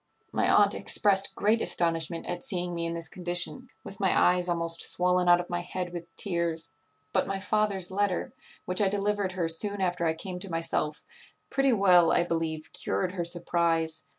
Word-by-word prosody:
My - - +1
aunt - - +5
expressed 195 -1 +1
great 220 +2 +2
astonishment 165 -1 0
at 175 0 -4
seeing 175 -1 -1
me 170 0 -2
in 165 - -3
this 165 -1 -4
condition, 175 +8 -3
with 195 - -10
my 190 -2 +2
eyes 180 0 +3
almost 170 -1 0
swollen 180 0 +2
out 175 0 +7
of 175 - -5
my 175 -1 -2
head 180 0 -5
with 170 -1 -6
tears; 170 -5 -1 0.4
but - - +1
my 195 0 -2
father's 200 -2 0
letter, 200 -1 -1 0.3
which 180 +3 +1
I 200 - +3
delivered 200 -1 -1
her 175 -3 -1
soon 200 +5 0
after 180 -2 0
I 160 - 0
came 180 +2 -6
to 195 - -3
myself, 165 -2 -2 0.5
pretty 270 0 +2
well, 180 -5 +5
I - - +3
believe, 165 -2 -3
cured 180 0 -1
her 180 -2 -3
surprize. 170 -2 -1
175 Hz, 180 wpm, -28 LUFS, 170-190 Hz, 0.5 s, out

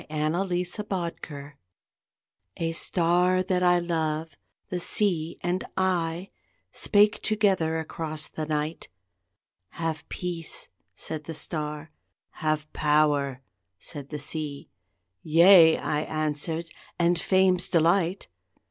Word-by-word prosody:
THE - - -16
WIND'S 175 +5 -1
WORD 165 -6 -5 1.0
A 165 0 -1
star 180 +2 +2
that 185 -1 0
I 180 0 +5
love, 160 -3 -2 0.3
The 180 - -2
sea, 175 -3 0
and 180 +1 -1
I, 180 -1 0 0.4
Spake 210 +1 +3
together 190 -7 +2
across 155 -1 -4
the 155 -1 -5
night. 155 +1 -2 0.9
"Have 165 -2 -4
peace," 175 -3 -4 0.3
said 155 -2 -5
the 165 - -5
star, 150 -1 -3 0.5
"Have 155 -1 0
power," 145 -3 +2 0.3
said 140 +9 -8
the 150 - -4
sea; 150 -1 -5 0.5
"Yea!" 165 - +7
I 150 - -1
answered, 155 +2 -2 0.3
"and 170 0 +2
Fame's 185 0 +3
delight!" 170 +2 +2
165 Hz, 105 wpm, -26 LUFS, 155-180 Hz, 1.0 s, Yea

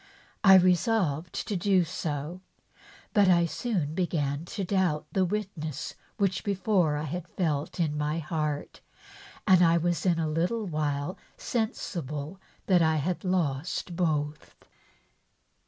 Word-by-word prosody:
I 195 -2 +9
resolved 180 - +2
to 205 - -1
do 185 0 +3
so, 155 +2 -4 0.7
but 205 -2 +5
I 170 -1 +5
soon 170 -5 -2
began 155 -4 -1
to 195 +3 -4
doubt 180 -5 +1
the 190 - +2
witness 175 -7 -4 0.2
which 195 -4 0
before 190 -5 +1
1 150 +1 -2
had 175 +3 -5
felt 155 -2 -2
in 155 -3 +1
my 150 +1 -1
heart, 155 -3 -3 0.6
and 185 -3 +6
1 170 -1 +4
was 175 -1 0
in 175 -2 +3
a 160 -1 0
little 175 +8 0
while 150 -1 -2 0.2
sensible 175 - -3 0.2
that 180 -3 +4
I 160 -1 +3
had 165 +4 -1
lost 175 -1 -1
both. 150 -4 -1
170 Hz, 130 wpm, -28 LUFS, 150-185 Hz, 0.7 s, I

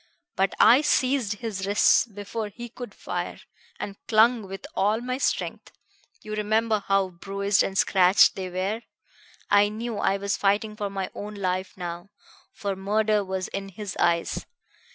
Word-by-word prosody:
But 195 0 +1
I 240 +5 +7
seized 260 -6 +1
his 200 -2 -5
wrists 205 +4 +4
before 210 +1 -5
he 240 +3 -9
could 245 +1 -8
fire, - - -4 0.4
and 200 -1 -5
clung 225 -1 +4
with 195 0 -8
all 210 +3 +1
my 255 +2 -3
strength - - -2 0.5
you 215 - -6
remember 215 0 +1
how 195 -1 +2
bruised 200 +3 0
and 195 - -1
scratched 185 0 +5
they 185 -1 -4
were. 190 +5 -2 0.7
I 205 0 +5
knew 220 0 -4
I 195 - +2
was 200 0 -1
fighting 205 +2 +1
for 205 -2 -3
my 195 -1 -4
own 210 +1 -7
life 185 -1 -2
now, 175 +1 -6 0.4
for 200 -1 -3
murder 210 +2 +1
was 190 -1 -3
in 195 0 -5
his 195 0 -7
eyes. 170 -1 0
205 Hz, 155 wpm, -25 LUFS, 195-220 Hz, 0.7 s, I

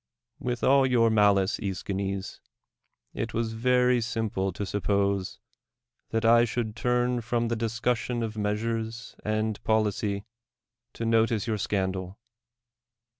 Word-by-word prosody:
With 125 -1 -3
all 135 0 +5
your 115 -3 +3
malice, 105 -1 +3
^Eschines, 100 -1 -3 0.7
it - - -4
was 115 0 -1
very 125 +1 +3
sim 115 -1 -2
ple 95 0 -1
to 100 - -4
suppose 100 -1 0 0.7
that 115 0 -1
I 115 +1 +6
should 115 -2 -2
turn 125 0 +1
from 115 0 -1
the 115 - 0
dis 115 0 -3
cussion 120 0 0
of 110 -1 -4
measures 110 +2 -3
and 110 0 -1
policy 105 -2 0 0.7
to 115 - -4
notice 115 -1 +2
your 110 -3 -1
scandal. 95 -1 -2
110 Hz, 125 wpm, -27 LUFS, 100-115 Hz, 0.7 s, I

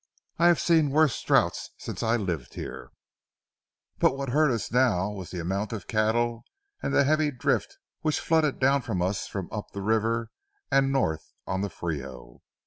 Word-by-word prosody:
I 170 - +6
have 175 -2 +5
seen 160 -4 +3
worse 150 -1 +3
drouths - - +2
since - - -6
I 115 +1 +2
lived 85 - -4
here, - - -7 1.1
but 135 - +3
what 135 -1 -3
hurt 150 +4 +3
us 115 -4 -2
now 105 -6 +2
was 95 -4 -7
the 90 - -5
amount 95 +6 -2
of 105 - -5
cattle 115 +2 +1 0.4
and - - -2
the 140 - +4
heavy 155 +1 +2
drift 130 -4 -1 0.2
which 155 -1 0
flooded 160 -4 +2
down 135 +1 +3
on 100 -6 -1
us 95 +2 -1
from 95 -4 -5
up 105 -1 -5
the 100 - -5
river 115 +2 0 0.4
and 135 0 +3
north 80 - -1
on 95 0 -2
the 100 - -1
Frio. 65 -9 -6
115 Hz, 175 wpm, -27 LUFS, 95-140 Hz, 1.1 s, I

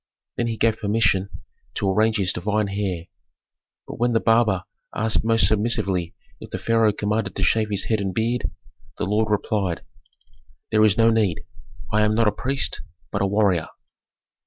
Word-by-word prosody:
Then 120 - -1
he 115 -1 -3
gave 110 0 +2
permission 100 -2 +1 0.5
to 100 - -1
arrange 110 +3 +2
his 95 -3 +1
divine 105 +3 -1
hair; 95 -4 -3 0.8
but - - -8
when 120 0 +2
the 115 - +3
barber 110 -5 +2 0.3
asked 110 0 +1
most 115 0 +3
submissively 100 -5 0 0.2
if - - -10
the - - -4
pharaoh 115 -2 +2
commanded 105 0 -2
to - - -2
shave 110 -1 +2
his 100 -2 -1
head 110 -2 0
and 95 -1 -2
beard, 115 +5 -1 0.5
the - - -2
lord 105 +3 +1
replied, 100 -4 -1 0.9
"There 110 -1 +4
is 105 -2 +4
no 115 0 +5
need. 105 -3 +1 0.5
I 105 - +4
am 105 0 +2
not 115 0 +3
a - - +4
priest, 135 +6 -1 0.3
but 100 - -1
a 100 - +2
warrior." 95 -5 +2
105 Hz, 170 wpm, -23 LUFS, 100-115 Hz, 0.9 s, no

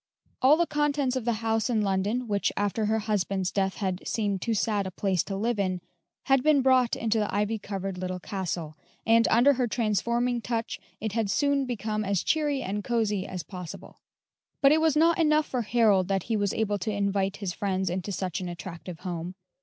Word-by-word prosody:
All 275 +4 +6
the 345 - +3
contents 295 -4 0
of 255 -3 -2
the 235 - +2
house 225 +1 +1
in 220 -3 +1
London, 205 +5 0
which 205 -2 0
after 205 +2 0
her 220 +1 +1
husband's 195 -3 -1
death 190 -1 0
had 190 -2 -2
seemed 205 -4 -1
too 230 +3 0
sad 205 -1 0
a - - -3
place 190 -2 0
to 195 - -4
live 220 +2 -1
in, 185 -2 0 0.4
had 270 -1 +3
been 290 -1 +4
brought 255 -2 +4
into 225 -1 0
the 210 - -1
ivy 210 +2 0
covered 195 -2 -5
little 185 0 -3
castle, 175 -5 -4 0.3
and 230 0 +5
under 245 +5 +5
her 250 -2 0
transforming 235 +2 0
touch 230 -1 -3 0.2
it 220 0 -3
had 220 -1 -1
soon 280 +3 +1
become 215 -3 -2
as 200 -2 0
cheery 295 -3 +1
and 205 +2 -3
cosey 210 -4 0
as 180 -3 -5
possible. 180 0 -9 0.6
But 275 0 +6
it 315 +1 +4
was 320 -2 +3
not 335 +2 +4
enough 305 -1 +3
for 250 -3 -2
Harold 215 -5 +3
that 195 -2 0
he 230 - -1
was 205 -2 +1
able 210 -2 -1
to 200 +4 -2
invite 200 -1 0
his 195 -4 -3
friends 190 +1 -1
into 185 +3 -2
such 185 -1 -3
an 180 - -4
attractive 175 0 -8
home. 175 -1 -5
210 Hz, 200 wpm, -27 LUFS, 190-240 Hz, 0.6 s, All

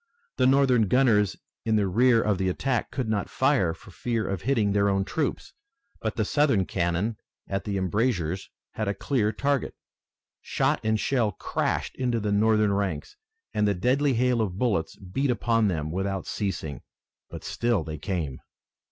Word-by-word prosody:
The 125 - +4
Northern 130 -5 +4
gunners 110 -5 +3 0.3
in 110 -1 +1
the 105 -2 +3
rear 115 +4 +4
of 105 -3 +1
the 95 -1 +1
attack 125 +6 -1
could 130 -4 -3
not 105 -2 -1
fire 130 - +2
for 80 +4 -12
fear 115 +2 -2
of 95 -4 -3
hitting 110 -4 +1
their 100 0 +3
own 95 0 +1
troops, 145 +7 -3 0.5
but 110 -1 -2
the 110 - 0
Southern 135 -8 +2
cannon 90 +6 -1 0.3
at 95 0 -3
the 100 -2 -1
embrasures 95 -2 -1 0.2
had 110 - -3
a 100 - 0
clear 115 -7 0
target. 140 +1 -1 0.7
Shot - - 0
and 110 0 +1
shell 120 -5 +1
crashed - - -2
into 125 -3 0
the 105 -1 -1
Northern 105 0 +3
ranks, 100 - -2 0.4
and 105 0 +2
the 100 - +1
deadly 130 +8 +2
hail 125 0 +2
of 95 -4 -2
bullets 100 -9 0
beat 115 +9 -2
upon 115 -1 +2
them 80 -5 -2
without 95 +1 -2
ceasing. 85 -8 -3 0.5
But - - -8
still 120 -3 0
they 80 -2 -6
came. 80 -6 -3
105 Hz, 170 wpm, -26 LUFS, 95-125 Hz, 0.7 s, The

